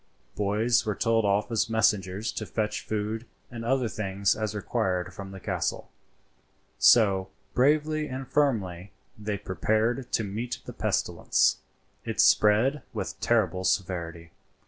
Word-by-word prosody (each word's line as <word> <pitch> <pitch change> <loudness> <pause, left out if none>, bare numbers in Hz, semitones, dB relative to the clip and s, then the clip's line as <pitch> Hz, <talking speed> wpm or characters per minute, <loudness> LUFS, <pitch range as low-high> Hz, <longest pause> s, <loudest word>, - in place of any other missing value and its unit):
Boys 110 +4 +2
were 105 -3 -2
told 115 0 +2
off 100 +3 +1
as 115 0 +1
messengers 105 -2 +1
to - - -5
fetch 105 -1 -2
food 110 +2 -3 0.2
and 115 -1 -6
other 130 +1 +1
things 100 -2 0
as 110 -1 -3
required 95 -4 -1
from 95 +1 -8
the 95 0 -9
castle. - - -3 0.9
So, 95 -5 +5 0.2
bravely 150 +3 +2
and 130 0 -6
firmly, 100 -11 0 0.2
they 105 -1 -3
prepared 110 +6 -1
to 115 - +2
meet 110 +4 -4
the - - -8
pestilence; - - +1 0.5
it - - -5
spread 115 +8 +4
with - - -5
terrible 95 -6 +1
severity. 85 -3 -2
105 Hz, 130 wpm, -27 LUFS, 95-120 Hz, 0.9 s, So